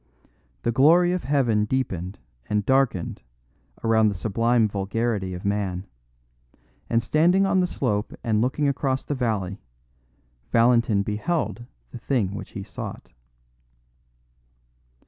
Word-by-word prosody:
The 120 - +1
glory 165 +8 +5
of 180 0 -2
heaven 120 -7 +2
deepened 100 -7 -2 0.3
and 105 -1 0
darkened 130 -9 +1 0.6
around 110 -1 +4
the 100 - 0
sublime 115 +4 +2
vulgarity 100 -1 -2
of 90 - -8
man; 100 -2 -1 1.0
and 115 0 +2
standing 175 +9 +3
on 195 -1 +2
the 180 - +2
slope 105 -10 -1
and 110 -2 +1
looking 135 +4 +1
across 135 -1 -1
the - - -2
valley, 105 -7 -2 0.9
Valentin 115 -3 +3
beheld 120 - -2 0.3
the - - -8
thing 115 -7 0
which 105 - -8
he 100 - -5
sought. 100 -1 -8
115 Hz, 120 wpm, -24 LUFS, 100-130 Hz, 1.0 s, glory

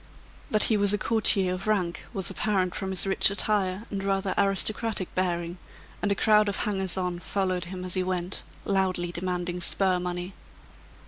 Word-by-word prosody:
That 215 - +2
he 220 - +3
was 205 0 +4
a - - -1
courtier 200 -4 +2
of 185 +3 -6
rank, 185 -5 -1
was 195 -6 +1
apparent 190 -4 0
from 190 - -4
his 190 0 +3
rich 195 0 +3
attire 200 -1 0
and 195 -1 -3
rather 195 0 0
aristocratic 200 0 +1
bearing 175 -1 -2 0.4
and 205 - 0
a - - +2
crowd 210 0 +4
of 200 - -3
hangers 190 -3 +1
on 180 -2 -2
followed 185 -1 -2
him 180 +1 -7
as 180 - -2
he 185 - +1
went, 185 0 -3 0.2
loudly 185 -3 0
demanding 180 0 -3
spur 185 +1 +3
money. 180 +1 -4
190 Hz, 175 wpm, -26 LUFS, 180-200 Hz, 0.4 s, was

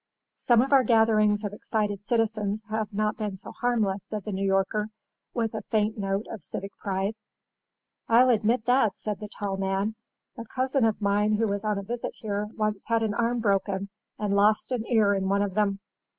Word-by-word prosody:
'" - - -56
"Some 240 -1 +6
of 275 - -1
our 270 -2 +7
gatherings 220 -3 +3
of 205 -1 -3
excited 205 -2 -2
citizens 215 -1 -1
have 220 -1 -2
not 210 +1 -1
been 210 -3 -3
so - - -10
harmless," 220 -7 0
said 210 -2 -4
the 210 - -5
New 195 0 -2
Yorker, 195 +2 +1 0.4
with 225 -3 -1
a 220 - -3
faint 215 0 +1
note 195 0 -2
of 220 - -7
civic 195 +1 -6
pride. 195 +1 -1 1.0
"I'll 245 +2 +6
admit 225 +1 +1
that," 245 -4 +3
said 210 -2 -4
the 210 - -7
tall 200 -2 -2
man. 195 +2 -1 0.5
"A 230 - -6
cousin 255 +2 0
of 220 -1 0
mine 205 +1 +2
who 220 +2 +2
was 200 -1 -2
on 210 -1 0
a 200 - -3
visit 235 +4 -4
here 210 -1 -3
once 215 -2 -1
had 230 -1 +2
an 215 -2 0
arm 235 +2 0
broken 200 -1 0 0.3
and 205 -1 0
lost 210 +4 +3
an 235 -3 -2
ear 215 -4 +4
in 190 -1 -1
one 200 +1 +2
of 200 -2 -3
them." 200 -1 +1
210 Hz, 200 wpm, -27 LUFS, 200-225 Hz, 1.0 s, our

